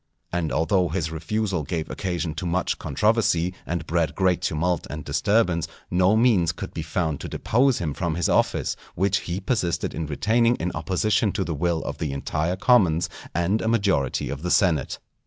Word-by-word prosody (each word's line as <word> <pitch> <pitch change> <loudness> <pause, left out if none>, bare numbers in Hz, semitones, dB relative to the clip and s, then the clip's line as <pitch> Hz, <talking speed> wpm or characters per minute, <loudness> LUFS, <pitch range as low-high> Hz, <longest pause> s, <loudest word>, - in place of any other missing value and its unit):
And 85 -2 -1
although 85 +3 +2
his 80 -1 -2
refusal 95 +3 -1
gave 80 +2 -3
occasion 85 -4 -3
to 90 +1 -4
much 90 +2 -1
controversy, 105 -5 +1
and 85 0 -2
bred 85 -1 0
great 95 -2 +2
tumult 85 +3 -1
and 75 0 -6
disturbance, 90 -6 +1 0.2
no 90 +3 +4
means 110 -8 +4
could 85 - -7
be 80 - -4
found 80 -1 -2
to - - -6
depose 130 +2 +2
him 75 -4 -2
from 85 +1 -2
his 85 -1 0
office, - - +1 0.2
which 95 +1 +2
he 90 +2 -1
persisted 95 -4 -1
in 80 -1 -3
retaining 115 - +2
in 90 -2 -3
opposition 95 +6 +1
to 95 - 0
the 85 - -3
will 85 +2 0
of - - -5
the 75 -3 -2
entire 80 +5 -1
commons 90 -6 +3 0.2
and 85 +6 +1
a - - -2
majority 100 - +1
of 70 0 -5
the 90 - -3
senate. 85 - +2
90 Hz, 180 wpm, -24 LUFS, 80-100 Hz, 0.2 s, no